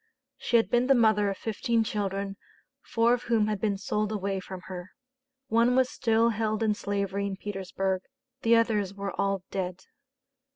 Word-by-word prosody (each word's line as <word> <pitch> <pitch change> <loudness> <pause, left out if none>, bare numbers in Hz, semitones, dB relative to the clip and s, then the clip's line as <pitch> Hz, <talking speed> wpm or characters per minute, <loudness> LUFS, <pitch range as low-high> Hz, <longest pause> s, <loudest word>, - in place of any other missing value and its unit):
She 240 - +3
had 225 - +1
been 245 +1 +3
the 270 - +6
mother 215 -3 +4
of 195 - -3
fifteen 230 +1 0
children, 200 -2 -2 0.5
four 235 +1 +2
of 245 0 -2
whom 225 -3 +2
had 210 -2 -2
been 205 -3 +1
sold 210 +2 -1
away 195 -2 -1
from 185 0 -8
her; 185 -1 -8 0.6
one 235 +2 +3
was 255 -1 +3
still 230 -2 +2
held 220 -1 -1
in 215 -1 +3
slavery 200 -1 -2
in 195 -1 -4
Petersburg; 190 -1 -2 0.4
the 230 0 +5
others 210 -4 +1
were 200 -1 -4
all 195 -1 0
dead. 185 -1 -3
210 Hz, 170 wpm, -28 LUFS, 195-230 Hz, 0.6 s, the